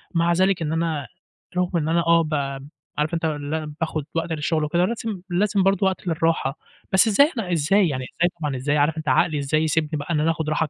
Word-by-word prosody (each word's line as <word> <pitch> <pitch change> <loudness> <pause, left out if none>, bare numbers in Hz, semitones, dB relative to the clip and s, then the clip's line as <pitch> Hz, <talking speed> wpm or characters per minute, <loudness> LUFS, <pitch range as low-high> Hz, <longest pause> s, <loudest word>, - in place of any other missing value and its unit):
مع 170 +1 +3
ذلك 185 0 +2
إن 155 -1 -1
أنا 160 -4 -1 0.5
رغم 180 0 +1
إن 155 0 -2
أنا 170 +1 +2
آه، 170 0 +5
ب 155 -1 -4 0.6
عارف 150 +2 -1
أنت 165 -1 -1
اللي 150 0 -2
أنا 155 -1 -6
باخد 155 -2 -1
وقت 165 0 -1
للشغل 155 0 0
وكده، 170 +4 +1
لازم 220 -2 -4
لازم 195 +2 +1
برضه 195 0 +2
وقت 190 -1 -3
للراحة. 165 -4 0 0.3
بس 190 +4 +5
إزاي؟ 280 - +5
أنا 190 -5 -3
إزاي 175 +4 +3
يعني 130 -3 -3
إزاي 175 +6 0
طبعًا، 145 -3 -1
إزاي؟ 145 +3 0
عارف 150 +2 +2
أنت 155 -1 -6
عقلي 150 +4 +2
إزاي 150 +3 +1
يسيبني 155 0 +1
بقى 145 +4 -3
إن 150 - +1
أنا 160 +2 +2
آخد 160 -1 -3
راحة؟ 155 +1 0
160 Hz, 225 wpm, -23 LUFS, 150-180 Hz, 0.6 s, آه